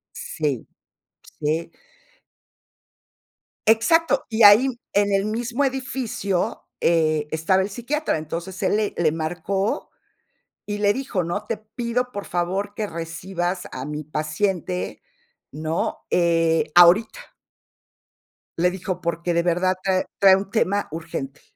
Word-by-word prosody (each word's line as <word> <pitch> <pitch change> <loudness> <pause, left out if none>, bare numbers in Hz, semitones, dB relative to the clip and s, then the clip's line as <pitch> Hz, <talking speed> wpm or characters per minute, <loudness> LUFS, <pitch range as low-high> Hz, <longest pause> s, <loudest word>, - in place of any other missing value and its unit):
Sí, 145 -6 -3 0.7
sí. 155 +3 -1 2.0
Exacto, 280 +7 +3
y 225 0 -1
ahí, 205 +5 +9
m 265 -2 -1 0.2
en 205 0 +2
el 195 0 +2
mismo 235 +5 -1
edificio, 255 -8 -2 0.2
eh, 155 -3 +2
estaba 160 +4 +2
el 190 - -2
psiquiatra, 245 - -2
entonces 170 +4 -6
él 190 - +2
le 210 -1 0
le 160 -3 +3
marcó 175 +5 -2 0.8
y 205 0 -3
le 205 -1 +3
dijo, 255 -6 -2
¿no?, 175 +5 -3
"Te 230 - -2
pido, 235 +3 -3
por 205 -4 -6
favor, 190 +4 -2
que 215 0 -2
recibas 175 +2 -4
a 130 - -6
mi 150 +1 -4
paciente", 165 +4 -2 0.5
¿no?, 155 +2 -2
eh, 165 -2 +2
"ahorita". 185 - +5 1.3
Le 180 +2 +4
dijo, 185 0 -4
porque 170 0 -1
de 170 0 +2
verdad 180 +2 +2
trae 190 -1 +1
trae 195 -1 +8
un 195 0 -3
tema 205 -1 +1
urgente. 150 -4 -6
185 Hz, 125 wpm, -23 LUFS, 165-215 Hz, 2.0 s, ahí